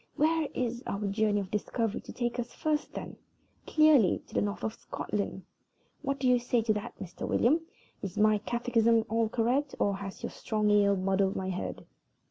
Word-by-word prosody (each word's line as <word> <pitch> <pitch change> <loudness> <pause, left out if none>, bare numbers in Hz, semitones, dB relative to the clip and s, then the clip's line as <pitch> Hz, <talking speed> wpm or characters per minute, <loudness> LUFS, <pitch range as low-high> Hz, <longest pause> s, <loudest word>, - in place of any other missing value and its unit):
Where 320 0 +2
is 240 -1 -1
our 200 +1 -2
journey 205 +1 +1
of 190 - -8
discovery 220 +1 -1
to - - -10
take 240 0 -2
us 240 - -2
to - - -19
first, 305 -1 0
then? - - -7 0.5
Clearly 310 - +5
to - - -19
the - - +2
north 205 0 -2
of 220 - -1
Scotland. 200 -3 -4 0.6
What 275 -1 -1
do 260 - +1
you 250 -1 +5
say 240 -1 +1
to 220 -1 +2
that, 210 +3 -5
Mr. 180 -3 -6
William? 300 +8 +3 0.4
Is 195 -3 -5
my 215 0 +4
catechism 230 0 +2
all 225 0 +1
correct, 250 +5 0
or 200 -1 +1
has 195 -1 -8
your - - -3
strong 215 -1 0
ale 200 -1 +5
muddled 195 +1 +1
my 190 0 -2
head?" 185 - -5
220 Hz, 190 wpm, -30 LUFS, 200-245 Hz, 0.6 s, Clearly